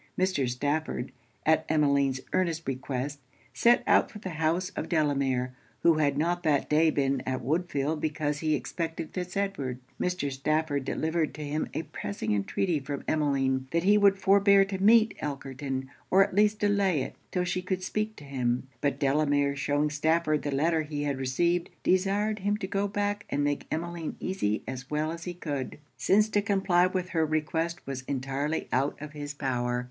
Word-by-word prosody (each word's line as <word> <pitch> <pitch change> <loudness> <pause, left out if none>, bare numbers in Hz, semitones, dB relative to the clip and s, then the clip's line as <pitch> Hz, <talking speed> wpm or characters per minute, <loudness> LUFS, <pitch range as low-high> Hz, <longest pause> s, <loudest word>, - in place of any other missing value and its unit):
Mr. 185 -9 +1
Stafford, 145 0 -2 0.3
at 160 0 +4
Emmeline's 140 -3 +2
earnest 170 -3 0
request, 135 +2 -3 0.3
set 240 +1 +4
out - - +4
for - - -10
the 195 -3 -6
house 165 +3 0
of - - -5
Delamere, 140 -5 +1 0.3
who 165 -2 +5
had 145 -2 +2
not 175 +3 +1
that 150 -4 +1
day 160 +2 +5
been 135 -3 +1
at 130 0 -2
Woodfield 150 0 -1
because 150 -1 -1
he 155 -1 +1
expected 160 +4 -4
Fitz 180 0 -4
Edward. 190 -11 -2 0.2
Mr. 180 -6 -1
Stafford 145 +1 0
delivered 160 +2 -1
to 155 - -6
him 150 +2 -2
a - - -1
pressing 110 -7 -3
entreaty 150 - 0
from 140 +1 -5
Emmeline 135 -3 +1
that 170 +2 0
he 205 +3 +5
would 200 -1 +5
forbear 200 0 +5
to 190 -1 -4
meet 220 +1 +5
Elkerton, 135 -2 -4 0.2
or 195 +1 +6
at 200 - -4
least 210 +2 +3
delay 200 -8 +2
it - - -7 0.2
'till 180 - 0
she 180 0 -1
could 185 0 -3
speak 215 +3 -2
to - - -12
him; 130 -2 -1
but 145 - 0
Delamere 145 0 +2
shewing 145 +1 0
Stafford 155 +1 +1
the 145 - -3
letter 160 +4 +2
he 150 -1 -4
had 140 -2 -1
received, 170 +7 +1
desired 200 +3 +1
him 205 +2 0
to 210 - -4
go 200 +1 -1
back 205 0 -2
and 145 - 0
make 145 0 -1
Emmeline 170 0 -3
easy 110 - -1
as 130 0 -6
well 150 +1 0
as 170 0 -7
he 175 -1 -4
could, 145 -6 -4 0.2
since 210 +2 +3
to 205 - +2
comply 190 -3 +3
with 185 -1 -2
her 165 -2 +1
request 160 +2 -1
was 135 -1 -4
entirely 140 +3 -2
out 135 +3 +1
of 150 0 -7
his 145 -1 -6
power. 125 -3 -1
155 Hz, 180 wpm, -28 LUFS, 140-185 Hz, 0.3 s, or